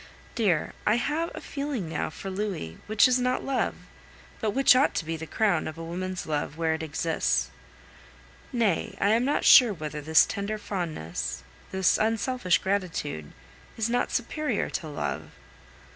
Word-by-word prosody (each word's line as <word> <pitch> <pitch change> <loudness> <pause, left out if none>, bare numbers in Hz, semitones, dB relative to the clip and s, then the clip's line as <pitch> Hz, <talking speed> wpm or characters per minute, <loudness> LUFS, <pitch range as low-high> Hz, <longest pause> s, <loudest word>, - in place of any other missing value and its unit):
Dear, 190 -9 +1
I 210 - +3
have 300 +7 -1
a - - -7
feeling 280 - -4
now 160 - -2
for 190 +5 -7
Louis 185 - -4
which 215 +2 +5
is 255 0 +2
not 250 0 0
love, 270 -1 0 0.6
but 220 - 0
which 265 +4 +5
ought 270 +3 +3
to - - -1
be 165 +1 -2
the 160 0 -7
crown 200 -4 +1
of 155 - -6
a 165 - -6
woman's 180 +2 -4
love 150 0 -2
where 165 -1 +1
it 160 - -3
exists. 140 - 0 1.0
Nay, 225 -8 0
I 200 - +3
am 230 +3 +3
not 290 +2 0
sure 240 -5 +8
whether 150 -2 -5
this 160 +2 +5
tender 200 +2 -3
fondness, 120 - -4 0.3
this 190 -1 +2
unselfish 225 -3 +1
gratitude, 170 - -2 0.5
is 225 +1 0
not 245 - +1
superior 255 0 -1
to 160 - -3
love. 75 - -4
190 Hz, 160 wpm, -27 LUFS, 160-235 Hz, 1.0 s, sure